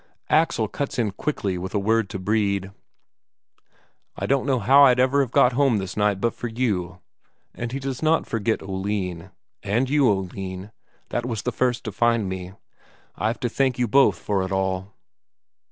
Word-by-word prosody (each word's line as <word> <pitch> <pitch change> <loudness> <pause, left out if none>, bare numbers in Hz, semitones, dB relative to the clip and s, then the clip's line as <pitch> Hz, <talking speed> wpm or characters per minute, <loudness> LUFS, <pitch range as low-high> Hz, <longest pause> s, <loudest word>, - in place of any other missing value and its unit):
Axel 150 -8 +2
cuts 140 +6 -4
in 110 -4 0
quickly 100 -7 -3
with 95 +3 -5
a - - +2
word 110 0 +1
to - - -5
Brede: 100 -1 0 1.5
"I - - -2
don't 135 0 +1
know 135 -2 +2
how 135 +6 +6
I'd 125 -2 +4
ever 130 +2 +3
have 135 - -1
got 125 +1 +4
home 135 -3 +3
this 95 -2 -4
night 105 -2 +1
but 115 +3 0
for 120 - -5
you." 105 -7 -2 0.6
And 120 0 -5
he 135 - -3
does 135 -2 -4
not 160 +1 +2
forget 115 0 -1
Oline: 95 -3 -3 0.3
"And 120 +7 0
you, 145 -4 +4
Oline, 95 0 -3 0.4
that 120 - -2
was 115 -4 -3
the 125 - -1
first 125 +1 0
to 110 - -4
find 115 0 +1
me. 95 0 -6 0.6
I've 110 +3 -1
to 120 - +1
thank 130 +1 0
you 125 -1 +1
both 110 -6 +4
for 100 +1 -1
it 95 0 -3
all." 95 0 -1
110 Hz, 180 wpm, -23 LUFS, 95-125 Hz, 1.5 s, how